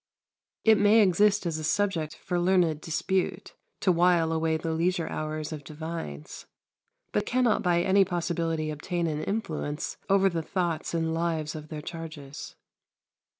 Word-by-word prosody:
It 220 Hz, -1 st, +6 dB
may 205 Hz, +2 st, +6 dB
exist 205 Hz, +1 st, +3 dB
as 160 Hz, -2 st, -1 dB
a -, -, -5 dB
subject 170 Hz, -3 st, 0 dB
for 180 Hz, -1 st, -2 dB
learned 175 Hz, -4 st, +2 dB
dispute 180 Hz, +4 st, -1 dB, 0.3 s
to 190 Hz, -, +4 dB
while 170 Hz, -1 st, +3 dB
away 160 Hz, 0 st, +1 dB
the 165 Hz, +1 st, -3 dB
leisure 170 Hz, +1 st, 0 dB
hours 155 Hz, 0 st, -4 dB
of 150 Hz, -2 st, -6 dB
divines, 155 Hz, -, -7 dB, 0.6 s
but -, -, -1 dB
cannot 250 Hz, -3 st, +2 dB
by 175 Hz, -1 st, +2 dB
any 195 Hz, +1 st, +5 dB
possibility 170 Hz, -3 st, -1 dB
obtain 170 Hz, +3 st, -2 dB
an 155 Hz, -2 st, -2 dB
influence 160 Hz, -7 st, -3 dB
over 195 Hz, 0 st, +5 dB
the 170 Hz, -3 st, -1 dB
thoughts 170 Hz, -1 st, -2 dB
and 165 Hz, -1 st, 0 dB
lives 165 Hz, -2 st, -1 dB
of 155 Hz, -1 st, -8 dB
their 150 Hz, -1 st, -7 dB
charges. 155 Hz, -4 st, -8 dB
165 Hz, 150 wpm, -27 LUFS, 155-185 Hz, 0.6 s, It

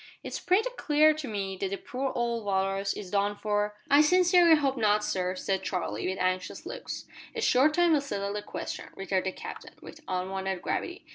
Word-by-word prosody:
"It's -, -, -5 dB
pretty 420 Hz, +7 st, +2 dB
clear 305 Hz, +1 st, +5 dB
to 305 Hz, -2 st, -6 dB
me 195 Hz, -3 st, -3 dB
that 195 Hz, 0 st, -2 dB
the 200 Hz, -, -3 dB
poor 260 Hz, +5 st, -3 dB
old 235 Hz, -1 st, -1 dB
Walrus 195 Hz, 0 st, 0 dB
is 190 Hz, -3 st, -8 dB
done 205 Hz, 0 st, +1 dB
for 210 Hz, 0 st, -1 dB
" -, -, -30 dB
"I 285 Hz, +1 st, +8 dB
sincerely 350 Hz, +1 st, +6 dB
hope 275 Hz, -3 st, +1 dB
not 210 Hz, -3 st, +2 dB
sir," 185 Hz, -2 st, -1 dB
said 190 Hz, +1 st, -1 dB
Charlie, 175 Hz, -, -3 dB
with 190 Hz, -, -3 dB
anxious 185 Hz, 0 st, -2 dB
looks. -, -, -6 dB, 0.3 s
"A 460 Hz, -, -2 dB
short 295 Hz, -, +4 dB
time 345 Hz, -2 st, +4 dB
will 295 Hz, -, +3 dB
settle 200 Hz, -7 st, -3 dB
the 210 Hz, -, -3 dB
question," -, -, -6 dB
returned 190 Hz, -1 st, -1 dB
the -, -, 0 dB
Captain, -, -, -9 dB
with 315 Hz, -, -12 dB
unwonted 190 Hz, 0 st, -2 dB
gravity. 360 Hz, +3 st, -3 dB
210 Hz, 200 wpm, -28 LUFS, 190-300 Hz, 0.3 s, I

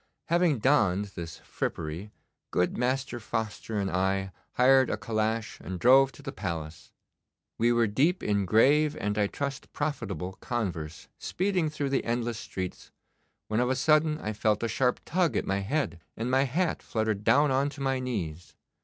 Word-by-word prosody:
Having 170 Hz, -4 st, +3 dB
donned 110 Hz, -6 st, +3 dB
this 80 Hz, -2 st, -7 dB
frippery, 85 Hz, +6 st, -4 dB, 0.4 s
good 90 Hz, -, +1 dB
Master 130 Hz, 0 st, -1 dB
Foster 110 Hz, 0 st, -3 dB
and 95 Hz, -1 st, -1 dB
I 95 Hz, +1 st, 0 dB, 0.2 s
hired 130 Hz, 0 st, +5 dB
a -, -, -1 dB
calash 110 Hz, -1 st, -2 dB
and 90 Hz, -1 st, -6 dB
drove 135 Hz, +6 st, +6 dB
to 145 Hz, -, -14 dB
the 135 Hz, -, -4 dB
Palace. 80 Hz, -, -6 dB, 0.7 s
We 120 Hz, +1 st, +4 dB
were 120 Hz, -1 st, +3 dB
deep 145 Hz, -, +1 dB
in 100 Hz, -2 st, +1 dB
grave 145 Hz, +9 st, +4 dB
and, 105 Hz, 0 st, -1 dB
I 105 Hz, -1 st, +2 dB
trust, 140 Hz, +4 st, -5 dB
profitable 95 Hz, -10 st, -3 dB
converse 85 Hz, -10 st, -4 dB
speeding 185 Hz, -4 st, 0 dB
through 145 Hz, -2 st, -3 dB
the 135 Hz, -, +1 dB
endless 120 Hz, -1 st, -2 dB
streets, 95 Hz, -4 st, -6 dB, 0.6 s
when 110 Hz, +1 st, 0 dB
of 125 Hz, 0 st, +2 dB
a 130 Hz, -, +2 dB
sudden 155 Hz, +3 st, +3 dB
I 110 Hz, -8 st, -4 dB
felt 105 Hz, +1 st, +1 dB
a -, -, +1 dB
sharp 125 Hz, +2 st, +1 dB
tug 165 Hz, -, +1 dB
at -, -, -1 dB
my 100 Hz, 0 st, 0 dB
head, 105 Hz, -, -1 dB, 0.2 s
and 115 Hz, +3 st, -2 dB
my 135 Hz, +1 st, +4 dB
hat 165 Hz, +7 st, 0 dB
fluttered 110 Hz, -2 st, -1 dB
down 145 Hz, +5 st, +4 dB
on 135 Hz, +2 st, +2 dB
to 140 Hz, 0 st, -10 dB
my 135 Hz, -1 st, 0 dB
knees. 90 Hz, -10 st, -4 dB
115 Hz, 170 wpm, -28 LUFS, 100-135 Hz, 0.7 s, drove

